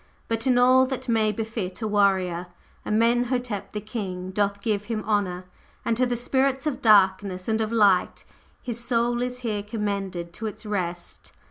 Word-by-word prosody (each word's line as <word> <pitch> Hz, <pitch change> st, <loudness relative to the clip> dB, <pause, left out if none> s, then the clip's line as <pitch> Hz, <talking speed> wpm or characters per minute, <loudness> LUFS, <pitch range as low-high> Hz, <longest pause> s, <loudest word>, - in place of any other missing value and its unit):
But 225 Hz, +2 st, -1 dB
in 250 Hz, -1 st, +4 dB
all 255 Hz, +1 st, +5 dB
that 265 Hz, -1 st, -5 dB
may 220 Hz, -2 st, +2 dB
befit 215 Hz, -3 st, -4 dB
a -, -, 0 dB
Warrior, 190 Hz, -4 st, +1 dB, 0.4 s
Amenhotep 235 Hz, -2 st, 0 dB
The 210 Hz, -, -3 dB
King 190 Hz, -4 st, -5 dB
doth 200 Hz, +1 st, 0 dB
give 210 Hz, -1 st, -1 dB
him 220 Hz, -2 st, -3 dB
honor, 190 Hz, -4 st, -1 dB, 0.4 s
and 230 Hz, -, +1 dB
to 250 Hz, +2 st, +2 dB
the 245 Hz, -1 st, -1 dB
Spirits 265 Hz, +3 st, +1 dB
of 300 Hz, -4 st, -2 dB
Darkness 195 Hz, -3 st, +3 dB
and 220 Hz, 0 st, +1 dB
of 220 Hz, 0 st, -1 dB
Light 205 Hz, -5 st, +3 dB, 0.4 s
his 235 Hz, -2 st, -3 dB
Soul 240 Hz, 0 st, 0 dB
is 250 Hz, 0 st, -3 dB
here 210 Hz, -2 st, -1 dB
commended 200 Hz, -5 st, -4 dB
to 220 Hz, +4 st, -5 dB
its 215 Hz, +1 st, -5 dB
Rest." 180 Hz, -4 st, -4 dB
215 Hz, 165 wpm, -25 LUFS, 195-235 Hz, 0.4 s, all